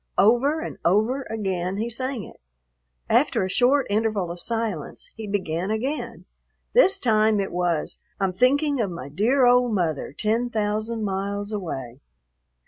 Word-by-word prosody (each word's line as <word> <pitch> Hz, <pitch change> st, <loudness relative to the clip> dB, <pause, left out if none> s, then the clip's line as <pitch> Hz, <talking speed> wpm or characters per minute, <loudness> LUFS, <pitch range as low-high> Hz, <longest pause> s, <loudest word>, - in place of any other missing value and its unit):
Over 255 Hz, +9 st, +3 dB
and -, -, -6 dB
over 220 Hz, +9 st, +1 dB
again 190 Hz, -4 st, -2 dB
he 220 Hz, +3 st, -1 dB
sang 255 Hz, 0 st, -3 dB
it. -, -, -14 dB, 0.7 s
After -, -, +2 dB
a -, -, -4 dB
short 255 Hz, +6 st, +3 dB
interval 205 Hz, -4 st, 0 dB
of 175 Hz, -, -5 dB
silence 225 Hz, -6 st, -3 dB
he 220 Hz, -2 st, -7 dB
began 185 Hz, -2 st, -2 dB
again. 255 Hz, +8 st, -3 dB, 0.5 s
This 475 Hz, -6 st, +6 dB
time 215 Hz, -3 st, +2 dB
it 195 Hz, -, -2 dB
was, 175 Hz, -3 st, -1 dB, 0.2 s
"I'm 190 Hz, -2 st, 0 dB
thinking 280 Hz, -, +2 dB
of 205 Hz, -, -1 dB
my 155 Hz, -6 st, -7 dB
dear 235 Hz, -, +2 dB
old 245 Hz, -1 st, +4 dB
mother, 165 Hz, -6 st, -1 dB
ten 225 Hz, -, 0 dB
thousand 215 Hz, +1 st, -2 dB
miles 200 Hz, +1 st, -3 dB
away." 135 Hz, -, -5 dB
215 Hz, 145 wpm, -24 LUFS, 185-240 Hz, 0.7 s, This